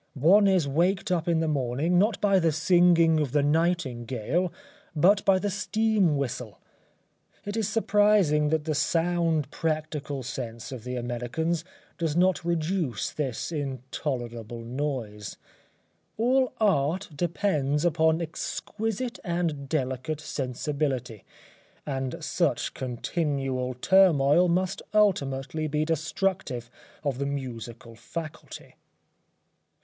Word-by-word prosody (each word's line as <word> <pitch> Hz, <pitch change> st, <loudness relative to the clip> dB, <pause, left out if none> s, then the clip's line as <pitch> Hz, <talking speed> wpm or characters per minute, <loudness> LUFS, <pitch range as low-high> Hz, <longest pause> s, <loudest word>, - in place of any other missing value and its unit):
One 190 Hz, +9 st, +5 dB
is 185 Hz, -6 st, +3 dB
waked 180 Hz, +7 st, +1 dB
up 175 Hz, -1 st, 0 dB
in 165 Hz, -1 st, +2 dB
the 160 Hz, -, 0 dB
morning, 145 Hz, +4 st, +1 dB
not 210 Hz, +3 st, +2 dB
by 195 Hz, -2 st, +4 dB
the 165 Hz, -2 st, +2 dB
singing 165 Hz, 0 st, +4 dB
of 145 Hz, -5 st, -1 dB
the 145 Hz, -1 st, +3 dB
nightingale, 150 Hz, -1 st, 0 dB, 0.4 s
but 190 Hz, +6 st, +4 dB
by 195 Hz, -1 st, +5 dB
the 205 Hz, +2 st, -1 dB
steam 205 Hz, -4 st, +1 dB
whistle. 125 Hz, -5 st, -4 dB, 0.9 s
It 205 Hz, +1 st, -4 dB
is 220 Hz, -2 st, 0 dB
surprising 205 Hz, -8 st, +3 dB
that 160 Hz, -1 st, +1 dB
the 155 Hz, 0 st, -1 dB
sound 165 Hz, 0 st, +1 dB
practical 155 Hz, -3 st, -3 dB
sense 120 Hz, -2 st, -6 dB
of 125 Hz, -3 st, -7 dB
the 125 Hz, 0 st, -3 dB
Americans 125 Hz, +8 st, -2 dB, 0.4 s
does 165 Hz, -2 st, -1 dB
not 185 Hz, 0 st, +3 dB
reduce 165 Hz, -, -1 dB
this 135 Hz, 0 st, -3 dB
intolerable 125 Hz, -5 st, -4 dB
noise. 120 Hz, -5 st, -4 dB, 0.8 s
All 255 Hz, +3 st, +2 dB
Art 185 Hz, -3 st, +2 dB
depends 155 Hz, -3 st, 0 dB
upon 160 Hz, 0 st, +2 dB
exquisite 225 Hz, +8 st, -4 dB
and 170 Hz, -7 st, -2 dB
delicate 135 Hz, 0 st, -2 dB
sensibility, 130 Hz, -4 st, -3 dB, 0.6 s
and 135 Hz, -3 st, -3 dB
such -, -, 0 dB
continual 130 Hz, -1 st, -2 dB
turmoil 175 Hz, +1 st, +5 dB
must 185 Hz, +2 st, 0 dB
ultimately 155 Hz, -7 st, +1 dB
be 150 Hz, +1 st, 0 dB
destructive 160 Hz, -5 st, -2 dB, 0.3 s
of 140 Hz, -4 st, -1 dB
the 140 Hz, -, -1 dB
musical 120 Hz, -4 st, -6 dB
faculty. 155 Hz, +6 st, -8 dB
155 Hz, 115 wpm, -27 LUFS, 130-175 Hz, 0.9 s, One